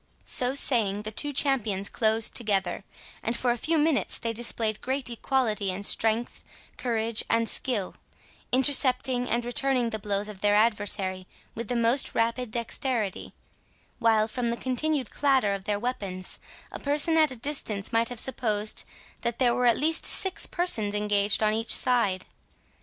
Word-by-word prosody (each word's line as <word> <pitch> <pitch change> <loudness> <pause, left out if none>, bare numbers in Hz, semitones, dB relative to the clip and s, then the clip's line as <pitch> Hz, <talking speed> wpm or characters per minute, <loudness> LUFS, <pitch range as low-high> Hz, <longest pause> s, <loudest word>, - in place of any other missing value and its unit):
So 255 0 +1
saying, 210 -7 +1
the 215 - -6
two 290 +7 0
champions 225 -9 0
closed 220 0 +1
together, 200 -4 0 0.4
and 230 +1 -2
for 245 - 0
a - - 0
few 320 +7 -1
minutes 305 -1 0
they 230 -1 -4
displayed 225 -2 0
great 260 -1 -2
equality 230 -5 -1
in 185 +2 -5
strength, 225 +3 +1 0.3
courage, 230 -2 -1
and 230 0 +1
skill, 220 -8 -1 0.6
intercepting 255 -1 +3
and 235 0 -1
returning 245 0 0
the 220 - -4
blows 205 0 -2
of 205 -3 -10
their 205 0 +2
adversary 205 -4 0 0.3
with 230 0 -7
the 245 - -3
most 235 +3 +1
rapid 230 +1 -1
dexterity, 235 -2 -3 0.6
while, 220 -1 +2
from 235 +1 -3
the 235 - -3
continued 265 +3 -2
clatter 265 -8 +1
of 195 -1 -6
their 205 -1 -1
weapons, 200 -6 -4 0.3
a - - -7
person 295 +3 +3
at 315 -2 +4
a 260 - -4
distance 230 -6 -2
might 230 0 +1
have 245 -2 -3
supposed 215 -5 0 0.4
that 235 -1 -3
there 245 -2 +2
were 250 0 +1
at 235 - +3
least 320 +3 +1
six 380 -1 +3
persons 220 - +2
engaged 210 0 +1
on 215 0 +2
each 225 +1 +3
side. 205 -7 +2
230 Hz, 160 wpm, -26 LUFS, 210-255 Hz, 0.6 s, at